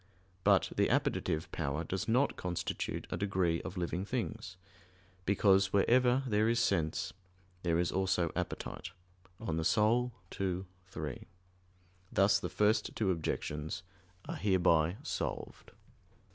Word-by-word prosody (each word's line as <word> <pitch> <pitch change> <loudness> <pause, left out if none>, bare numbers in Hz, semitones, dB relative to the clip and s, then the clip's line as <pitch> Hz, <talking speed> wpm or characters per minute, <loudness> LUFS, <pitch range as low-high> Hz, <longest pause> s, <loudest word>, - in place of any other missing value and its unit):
But - - +4
the - - +3
appetitive 80 +1 0
power 75 +4 -2
does 95 +4 -3
not 125 +5 +3
constitute 90 -1 -3
a - - -1
degree 95 -4 +1
of 95 - -7
living 90 +1 -1
things; 110 -4 -4 0.7
because 95 -1 +4
wherever 125 +5 +4
there 110 -2 +2
is 115 0 +2
sense 80 -5 0 0.5
there 85 -2 +1
is 85 0 +1
also 95 -3 +1
appetite 90 - -4 0.5
(De - - -11
Anima 105 +9 +2 0.3
ii, 95 -1 -1 0.2
3). 75 -6 -6 0.8
Thus 100 +1 +4
the - - -4
first 105 +1 +1
two 100 -4 +1
objections 80 -1 -3 0.4
are - - -4
hereby 90 -2 +3
solved. - - -4
95 Hz, 120 wpm, -33 LUFS, 85-105 Hz, 0.8 s, But